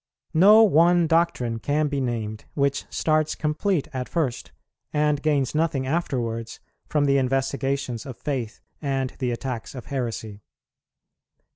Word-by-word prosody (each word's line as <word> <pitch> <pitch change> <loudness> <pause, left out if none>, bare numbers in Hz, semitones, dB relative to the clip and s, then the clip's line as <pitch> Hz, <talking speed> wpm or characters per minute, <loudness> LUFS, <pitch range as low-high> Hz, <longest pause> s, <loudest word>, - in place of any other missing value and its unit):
No 205 +7 +7
one 175 -2 +5
doctrine 160 -9 +1
can 150 +5 +1
be 140 -1 -2
named 110 -4 -3
which 140 0 0
starts 155 -1 +1
complete 155 +2 0
at 130 -1 -4
first, 145 -8 -2 0.4
and 150 -1 +1
gains 145 -4 +1
nothing 155 -4 0
afterwards 120 -7 -2 0.3
from 150 -2 +1
the 140 -1 +3
investigations 135 -1 -1
of 130 - -7
faith 125 -7 -4 0.2
and 135 -3 -1
the 130 -2 0
attacks 120 0 -4
of 125 - -7
heresy. 115 -5 -4
140 Hz, 130 wpm, -24 LUFS, 125-155 Hz, 0.4 s, No